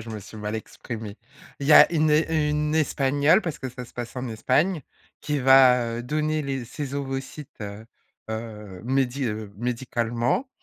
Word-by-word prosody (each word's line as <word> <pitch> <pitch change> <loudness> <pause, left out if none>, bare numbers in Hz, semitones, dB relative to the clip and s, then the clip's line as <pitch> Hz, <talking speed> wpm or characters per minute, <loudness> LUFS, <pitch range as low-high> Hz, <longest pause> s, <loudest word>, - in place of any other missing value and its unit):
je 110 - -10
me 110 -1 -6
suis 105 - -12
mal 105 0 -4
exprimé. 110 -1 -7 0.4
Il 140 - -4
y 155 - +5
a - - +9
une 155 -1 +3
é 155 0 +2
une 150 0 0
espagnole, 145 +2 +3
parce 165 -2 -4
que 130 - -5
ça 125 0 -8
se 120 - -17
passe 120 0 -6
en 125 0 -3
Espagne, 145 - +1 0.4
qui 150 -1 -1
va, 125 -3 +5
heu, - - -4
donner 155 +4 -1
les 135 -3 -3
ses 140 +3 -6
ovocytes, 135 0 -6
heu 105 +1 -7 0.5
heu, 105 -4 -7
médi 135 +1 0
heu, 105 -3 -4
médicalement 120 - -1
130 Hz, 175 wpm, -25 LUFS, 115-150 Hz, 0.5 s, a